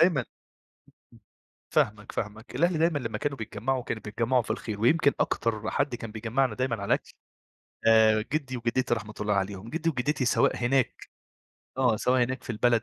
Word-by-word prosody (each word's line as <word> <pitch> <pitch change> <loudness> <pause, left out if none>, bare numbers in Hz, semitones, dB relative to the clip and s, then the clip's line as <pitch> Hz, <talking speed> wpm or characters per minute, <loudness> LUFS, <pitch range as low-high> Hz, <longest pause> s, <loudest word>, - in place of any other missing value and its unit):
دايمًا 165 -8 +4 1.5
فاهمك، 105 0 0
فاهمك. 110 +3 -5
الأهل 170 +5 +2
دايمًا 165 -1 +2
لمّا 115 -5 -4
كانوا 145 -1 -2
بيتجمّعوا، 120 +3 -2
كانوا 110 - -4
بيتجمّعوا 115 +4 +1
في - - -12
الخير 110 -2 -3
ويمكن 140 +4 +4
أكتر 110 -2 0
حد 140 -3 0
كان 115 -2 -6
بيجمّعنا 115 +4 0
دايمًا 130 -1 0
على 100 - -6
الأكل، - - 0 0.7
آآ 110 -1 +5
جِدّي 135 -4 -1
وجِدّتي 120 +1 0
رحمة 105 -2 -7
الله 105 0 +1
عليهم. 100 +2 -2
جِدّي 165 +1 0
وجِدّتي 135 0 -1
سواء 120 - +3
هناك 125 +1 +1 0.8
آه. 125 -4 +3
سواء 125 +3 +2
هناك 130 +1 -2
في - - -7
البلد 115 +1 +2
120 Hz, 165 wpm, -27 LUFS, 110-135 Hz, 1.5 s, آآ